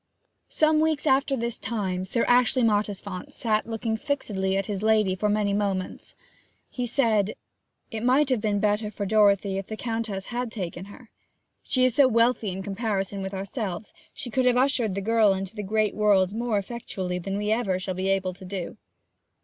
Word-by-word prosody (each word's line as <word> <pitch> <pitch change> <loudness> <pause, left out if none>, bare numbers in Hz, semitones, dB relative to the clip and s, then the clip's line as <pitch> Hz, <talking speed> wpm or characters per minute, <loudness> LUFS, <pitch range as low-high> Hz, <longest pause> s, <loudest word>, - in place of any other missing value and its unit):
Some 310 0 +3
weeks 315 -1 +1
after 275 -1 +2
this 235 0 -3
time 190 -5 -2
Sir 230 +5 0
Ashley 250 +1 +3
Mottisfont 205 -3 -1
sat 215 -2 0
looking 225 0 -2
fixedly 210 -8 -1
at 195 - -1
his 200 -2 -3
lady 215 -3 +3
for 210 +3 0
many 205 -1 +1
moments. 200 -2 -2 0.6
He 250 -1 -3
said: 220 -5 +1 0.6
'It 220 - -4
might 260 +4 +3
have 245 -4 +1
been 210 -2 0
better 210 +1 +1
for 205 -1 -4
Dorothy 200 -2 +3
if 195 - -7
the 220 - -6
Countess 225 -5 -3
had 245 -1 -2
taken 185 -4 -5
her. 215 +3 -14 0.5
She 255 -1 +2
is 255 - +2
so 275 +2 +6
wealthy 230 -2 +2
in 190 +1 -5
comparison 200 -1 -2
with 190 +1 -4
ourselves, 200 0 -5 0.3
and 240 - -8
could 260 -1 +2
have 245 0 +4
ushered 250 -6 +2
the 200 - -2
girl 220 -1 +4
into 195 +2 -5
the 210 - -4
great 215 +1 0
world 200 -3 +3
more 230 -1 0
effectually 190 -4 -4
than 195 +3 -3
we 210 +1 -1
ever 220 -5 +1
shall 185 0 -3
be 185 +1 -2
able 190 -1 0
to 185 - -14
do.' 185 -1 -5
210 Hz, 185 wpm, -26 LUFS, 195-235 Hz, 0.6 s, so